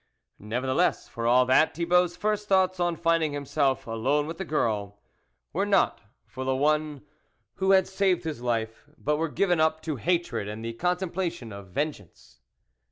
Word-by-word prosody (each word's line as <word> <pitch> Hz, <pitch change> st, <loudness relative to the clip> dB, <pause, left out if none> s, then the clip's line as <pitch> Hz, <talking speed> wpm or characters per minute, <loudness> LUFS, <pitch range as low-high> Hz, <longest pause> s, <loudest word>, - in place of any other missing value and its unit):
Nevertheless, 130 Hz, -, 0 dB
for 115 Hz, -1 st, -4 dB
all 125 Hz, +1 st, +5 dB
that, 130 Hz, +5 st, +3 dB
Thibault's 175 Hz, +1 st, +2 dB
first 210 Hz, +2 st, -1 dB
thoughts 185 Hz, -2 st, +2 dB
on 175 Hz, -1 st, +1 dB
finding 165 Hz, -2 st, +1 dB
himself 140 Hz, -1 st, 0 dB
alone 130 Hz, +6 st, 0 dB
with 165 Hz, +3 st, -7 dB
the -, -, -2 dB
girl, 105 Hz, -10 st, -1 dB, 0.5 s
were 190 Hz, +6 st, +1 dB
not 200 Hz, -2 st, +2 dB, 0.2 s
for 130 Hz, -, -7 dB
the 130 Hz, 0 st, 0 dB
one 150 Hz, 0 st, 0 dB, 0.5 s
who 190 Hz, +1 st, 0 dB
had 190 Hz, -1 st, +4 dB
saved 190 Hz, -2 st, +1 dB
his 155 Hz, -7 st, -5 dB
life, 115 Hz, +2 st, -3 dB
but 150 Hz, 0 st, 0 dB
were 165 Hz, +1 st, -1 dB
given 175 Hz, +1 st, +1 dB
up 155 Hz, 0 st, +2 dB
to 155 Hz, -4 st, -3 dB
hatred 165 Hz, -, -1 dB
and 110 Hz, +2 st, -6 dB
the 115 Hz, -, -4 dB
contemplation 175 Hz, -, -2 dB
of 100 Hz, -1 st, -9 dB
ven 145 Hz, +12 st, -1 dB
geance. 90 Hz, -, -19 dB
155 Hz, 165 wpm, -27 LUFS, 125-175 Hz, 0.5 s, all